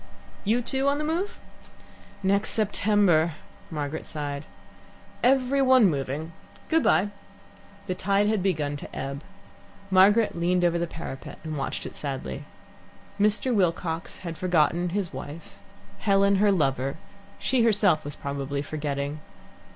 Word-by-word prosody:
"You, 230 +4 +1
too, 270 +3 0
on 280 0 +3
the 300 - -2
move?" 335 +6 -2 0.8
"Next 200 +2 +2
September," 200 -6 +3 0.4
Margaret 150 -1 -4
sighed. 145 -1 -4 0.8
"Every 265 +1 +3
one 255 -7 +6
moving! 145 +3 -3 0.4
Good 325 0 +4
bye." 185 - +3 0.8
The 185 - -1
tide 200 +2 +1
had 215 -2 +1
begun 150 -6 0
to - - -10
ebb. 140 +1 -4 0.7
Margaret 205 +4 +5
leant 175 +1 +1
over 170 -1 +2
the 170 - -1
parapet 160 -5 -8
and 155 -1 -4
watched 135 -2 -3
it - - -6
sadly. 135 - -5 0.7
Mr. 210 +5 +2
Wilcox 170 -4 0
had 165 -2 -5
forgotten 175 0 +2
his 185 -2 -2
wife, 145 +5 -9 0.4
Helen 200 -1 +3
her 205 +1 +4
lover; 135 -6 0 0.4
she 255 -1 +1
herself 205 -8 +4
was 145 0 -6
probably 140 0 -3
forgetting. 145 -1 -3
175 Hz, 130 wpm, -26 LUFS, 150-210 Hz, 0.8 s, one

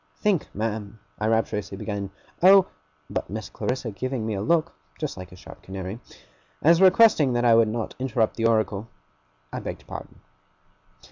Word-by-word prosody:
'Think, 200 -7 0
ma'am,' 110 0 -3 0.2
I 105 - 0
rapturously 105 -3 -1
began, 100 -1 -4 0.3
'oh! 190 +1 +8 0.2
' 75 0 -40
But - - -3
Miss - - -5
Clarissa 125 -2 -3
giving 130 +2 -3
me 110 - -2
a 100 - -2
look 160 - +1 0.3
(just - - -3
like 90 0 -9
a - - -12
sharp 90 - -13
canary), 95 +3 -6 0.6
as 165 +3 +5
requesting 190 - +6
that 120 0 +1
I 115 - +6
would 115 -1 +5
not 110 0 -3
interrupt 120 -4 0
the 115 -1 +2
oracle, 110 -2 0 0.7
I - - -3
begged - - -7
pardon. - - -9
110 Hz, 165 wpm, -25 LUFS, 100-130 Hz, 0.7 s, oh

